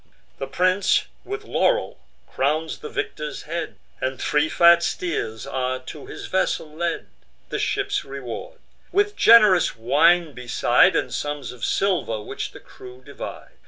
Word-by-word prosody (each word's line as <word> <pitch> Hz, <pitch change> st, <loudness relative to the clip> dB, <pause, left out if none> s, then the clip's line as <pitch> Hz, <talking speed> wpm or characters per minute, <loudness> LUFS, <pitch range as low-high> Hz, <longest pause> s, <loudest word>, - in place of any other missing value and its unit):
The 135 Hz, -, -4 dB
prince 185 Hz, +7 st, +2 dB, 0.2 s
with 410 Hz, +2 st, -5 dB
laurel -, -, 0 dB, 0.3 s
crowns 155 Hz, +4 st, -1 dB
the -, -, -7 dB
victor's 150 Hz, -1 st, -4 dB
head, 170 Hz, +2 st, -4 dB, 0.3 s
And 130 Hz, 0 st, -2 dB
three 150 Hz, +1 st, +1 dB
fat 170 Hz, 0 st, +6 dB
steers 150 Hz, -12 st, -3 dB
are 130 Hz, 0 st, -2 dB
to 130 Hz, +3 st, -10 dB
his -, -, -8 dB
vessel 165 Hz, -4 st, -1 dB
led, 170 Hz, +2 st, -3 dB, 0.4 s
The -, -, -3 dB
ship's -, -, -1 dB
reward; 140 Hz, -, -7 dB, 0.3 s
with 410 Hz, +2 st, +1 dB
gen'rous 215 Hz, -6 st, +6 dB
wine 155 Hz, +8 st, +3 dB
beside, 125 Hz, -2 st, +3 dB
And -, -, -1 dB
sums 145 Hz, -3 st, -4 dB
of 125 Hz, -2 st, -12 dB
silver, 180 Hz, -, 0 dB
which 105 Hz, -, -5 dB
the -, -, -13 dB
crew 125 Hz, 0 st, -14 dB
divide. -, -, -9 dB
155 Hz, 140 wpm, -23 LUFS, 130-180 Hz, 0.4 s, fat